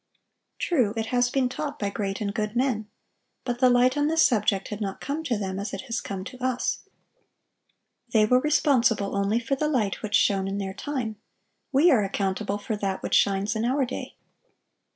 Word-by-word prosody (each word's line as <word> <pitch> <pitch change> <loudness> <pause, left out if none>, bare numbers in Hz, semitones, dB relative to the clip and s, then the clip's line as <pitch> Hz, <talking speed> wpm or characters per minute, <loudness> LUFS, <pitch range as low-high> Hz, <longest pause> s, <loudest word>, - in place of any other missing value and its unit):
True, 245 - +1
it 225 - 0
has 245 0 +3
been 265 0 +1
taught 290 +3 -4
by 200 -1 -2
great 195 -1 -3
and 200 -1 -2
good 210 +1 -2
men; 240 -4 0 0.6
but 245 -1 -3
the 255 -1 +5
light 245 +1 +4
on 290 0 +1
this 320 +1 +4
subject 205 -5 +1
had 210 0 -6
not 195 -2 -3
come 290 +4 -3
to 245 -6 0
them 190 -2 -3
as 200 - -4
it - - -6
has 240 -2 -3
come 195 -2 -5
to 250 +5 -9
us. 255 -1 0 1.3
They 215 -2 +5
were 250 +4 +4
responsible 245 -8 +2
only 200 +3 +1
for 240 +3 -3
the 300 +3 -1
light 230 -10 0
which 210 - -1
shone 195 -1 +3
in 195 +1 -3
their 195 -1 -3
time; 225 0 -4 0.5
we 295 +6 +5
are 220 -6 +4
accountable 195 +1 -1
for 210 +1 -3
that 195 -2 -3
which - - -3
shines 200 +2 +2
in 220 - -1
our 265 +3 +1
day. 250 - -6
225 Hz, 195 wpm, -26 LUFS, 200-255 Hz, 1.3 s, the